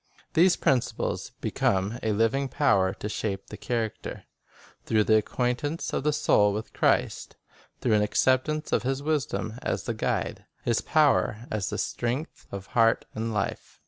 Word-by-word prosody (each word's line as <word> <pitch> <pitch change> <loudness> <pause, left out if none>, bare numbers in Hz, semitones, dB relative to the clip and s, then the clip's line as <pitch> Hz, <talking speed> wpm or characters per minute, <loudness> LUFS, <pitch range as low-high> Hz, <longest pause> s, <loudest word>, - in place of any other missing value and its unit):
These 175 +2 +5
principles 130 -3 0
become 100 +5 0
a 110 - 0
living 115 +6 +1
power 100 -11 +3
to - - -5
shape 100 -2 -3
the - - -5
character, 115 -3 -3 0.6
through 110 -1 +2
the 110 +1 +4
acquaintance 125 +8 -1
of - - -1
the 150 - +3
soul 105 -8 +3
with 110 +2 -5
Christ; - - +1 0.5
through 120 - +2
an 105 - +4
acceptance 130 +8 +1
of - - +2
His 135 +2 -2
wisdom 145 -6 -1
as - - -2
the - - -2
guide, - - -2 0.2
His 115 -1 +2
power 140 -7 +2
as 105 -3 -1
the - - -3
strength, 125 +7 -3
of 100 -1 -6
heart 115 -1 +4
and 115 +1 -3
life. 105 -2 -3
115 Hz, 155 wpm, -27 LUFS, 105-140 Hz, 0.6 s, These